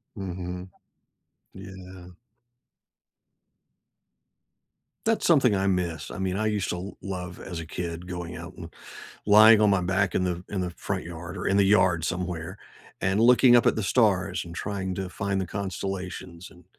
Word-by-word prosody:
Mhm. 90 -2 -6 0.8
Yeah. 95 -1 -11 2.9
That's 225 0 +1
something 135 -10 +4
I 95 0 0
miss, 85 -5 -1
I - - -7
mean, 95 -1 -2
I 110 +2 0
used 105 -2 -1
to - - -1
l 95 +3 -8
love 90 -2 -6
as 85 -3 -6
a - - -8
kid 85 +1 -5
going 90 -1 -6
out 85 +3 -9
and 85 -1 -10 0.5
lying 110 +1 +8
on 105 - +5
my 100 -2 +2
back 95 +1 0
in 90 - +1
the 90 -1 -2
in 100 - -3
the 90 - -3
front 95 +2 -4
yard 85 +2 -8
or 90 - -4
in 100 - +2
the - - +6
yard 90 -5 +3
somewhere 90 -1 -4 0.4
and 95 +3 +1
looking 125 +1 +6
up 120 - +5
at - - +3
the 110 - -1
stars 100 -3 +1
and 85 -1 -10
trying 95 +1 -3
to 95 0 -4
find 100 0 -2
the 95 - -3
constellations, 95 -2 -5
and, 90 -2 -18
95 Hz, 170 wpm, -26 LUFS, 90-100 Hz, 2.9 s, lying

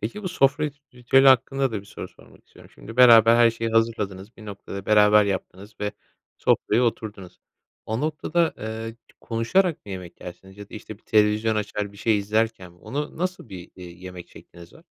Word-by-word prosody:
Peki 210 - -5
bu 185 - -3
sofra 145 -3 +1
rit 145 -1 -6
ritüeli 135 +2 +4
hakkında 135 0 +2
da 105 - -3
bir - - -18
soru - - -9
sormak - - -21
istiyorum. - - -18
Şimdi 115 - -12
beraber 115 -2 +7
her 120 -1 +5
şeyi 115 0 -4
hazırladınız, 110 -2 -1
bir 110 - -13
noktada 100 -1 -8
beraber 105 0 +5
yaptınız 100 +1 -5
ve 105 0 -2 0.5
sofraya 115 +4 +1
oturdunuz. 105 -5 -4 0.5
O 110 +2 -2
noktada, 160 +2 -1
ııı, 110 +1 -6 0.2
konuşarak 145 - 0
mı 100 - -7
yemek 90 -2 -9
yersiniz 95 +2 -11
ya 105 -1 -10
da - - -11
işte 110 -1 -9
bir - - -34
televizyon 110 0 +2
açar, 105 -1 -3
bir - - -16
şey 105 +1 +1
izlerken 105 -2 -2
mi 90 - -24
onu 145 - -6
nasıl 180 -8 -4
bir, 90 -2 -10
eee, 90 - -10
yemek 90 0 -10
şekliniz 85 -1 -15
var? - - -19
110 Hz, 190 wpm, -24 LUFS, 100-125 Hz, 0.5 s, beraber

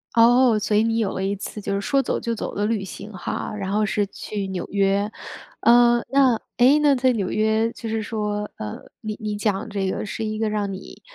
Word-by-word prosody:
哦， 235 -1 +5
所 210 0 +1
以 215 - +4
你 225 0 +1
有 210 -4 0
了 190 - -3
一 200 +1 0
次 210 +2 -7
就 200 - -3
是 200 - -1
说 275 +5 +2
走 - - -1
就 230 0 -2
走 - - -5
的 205 +1 0
旅 220 -3 -1
行 200 +2 -9
哈， 185 - -4
然 195 -2 -3
后 210 +1 +2
是 205 0 +1
去 200 0 -5
纽 185 -2 -3
约。 200 +1 +1 0.5
呃， 240 0 +5
那， 265 -4 +4 0.2
诶 260 +4 +6
那 295 -2 +4
在 255 0 +3
纽 200 -5 -1
约 220 +1 +1
就 230 - -7
是 220 -1 -1
说， 210 -1 -2
呃， 105 -1 -5 0.2
你 215 -1 -5
你 210 -1 -3
讲 205 +1 -1
这 195 -2 -1
个 - - -3
是 225 - -4
一 215 0 -2
个 220 -1 0
让 205 -2 -1
你， 190 0 -9
215 Hz, 240 characters per minute, -23 LUFS, 200-230 Hz, 0.5 s, 诶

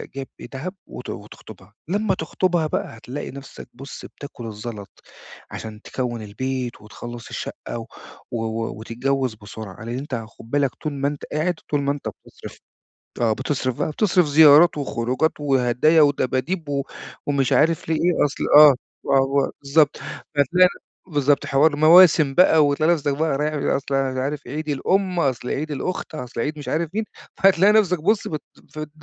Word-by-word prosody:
جايب 135 -1 -5
إيه - - -9
دهب 160 +8 -5
وت - - -9
وتخطبها. 95 +3 -11
لما 200 +2 0
تخطبها 170 0 0
بقى 115 - -4
هتلاقي 125 +5 -7
نفسك 140 0 -11
بُص، 135 +3 -10
بتاكل 140 -4 -10
الزلط 105 -1 -8 0.5
عشان 110 -1 -8
تكوّن 120 -3 -4
البيت 125 +3 -4
وتخلّص 120 +2 -9
الشقة - - -6
و - - -7 0.5
و 120 - -2 0.3
و 100 - -10
وتتجوز 125 +2 -2
بسرعة. 110 0 -10
لأن 120 +2 -4
أنت 140 0 -4
خد 115 0 -9
بالك، 140 -3 +1
طول 155 - -5
ما 140 0 -1
أنت 145 0 -5
قاعد، 165 +4 0 0.2
طول 145 -1 +1
ما 140 0 0
أنت 145 0 -5
بتصرف، - - -13 0.6
آه 115 -2 +3
بتصرف 130 0 -2
بقى - - -1
بتصرف 180 +1 +2
زيارات 155 +3 +7
وخروجات 130 +2 0
وهدايا 135 +3 +3
ودباديب 145 +3 0
و 140 -1 -1 0.4
ومش 140 -3 +1
عارف 160 +1 +2
ليه 160 - +2
إيه 175 -1 +2
أصل 145 - -3
آه 150 -2 +9 0.3
و 140 - -1
و 135 +1 +2
بالضبط، 145 +1 +3 0.4
فهتلاقي 180 +6 +4 0.4
بالضبط 145 -4 +1
حوار 145 +2 +3
مواسم 155 -2 +6
بقى 160 -4 +6
وتلاقي 155 +4 +2
نفسك 145 -3 -1
بقى 155 -3 0
رايح 150 0 0
أصل 140 0 -2
عارف 135 +1 -2
إيه - - -7
عيد 155 0 -4
الأم، 185 +5 0
أصل 130 -5 -1
عيد 155 +2 -3
الأخت، 160 +4 -4
أصل 125 -5 -5
عيد 150 +4 -3
مش 145 - -9
عارف 165 +1 -1
مين، 220 - 0 0.3
فهتلاقي 195 +1 +5
نفسك 190 -5 +3
بُص 210 +3 +2
بت 155 -2 -4 0.3
ف 155 - -7
د 155 -1 -5
145 Hz, 165 wpm, -22 LUFS, 130-160 Hz, 0.6 s, آه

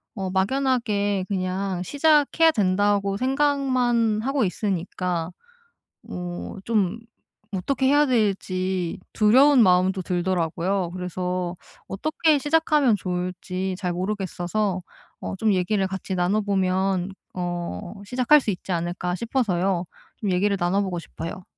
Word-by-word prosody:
어 190 -2 -3
막연하게 205 -3 0
그냥 185 -1 -2
'시작해야 300 - +3
된다.'고 200 -2 +1
생각만 255 -4 +1
하고 270 +1 0
있으니까 180 -3 -2 0.7
뭐 180 +2 -6
좀 210 -3 +1 0.5
어떻게 260 +8 0
해야 290 +2 +5
될지 190 -6 0
두려운 255 +5 +6
마음도 185 0 +3
들더라고요. 175 0 -1
그래서 180 0 -3 0.3
어떻게 310 - +1
시작하면 295 -4 +3
좋을지 180 +1 -3
잘 180 -1 -2
모르겠어서 190 0 -2 0.4
어 - - -4
좀 215 +1 +2
얘기를 190 +2 +1
같이 190 0 -4
나눠보면 190 -1 +1 0.2
'어 175 - -4
시작할 250 +6 +4
수 - - -3
있지 185 +1 -6
않을까?' 175 +1 -2
싶어서요. 195 -6 0 0.3
좀 200 -3 -2
얘기를 200 +2 +1
나눠 185 +3 +1
보고 185 -3 -2
싶어요. 165 +2 -7
195 Hz, 270 characters per minute, -24 LUFS, 180-230 Hz, 0.7 s, 두려운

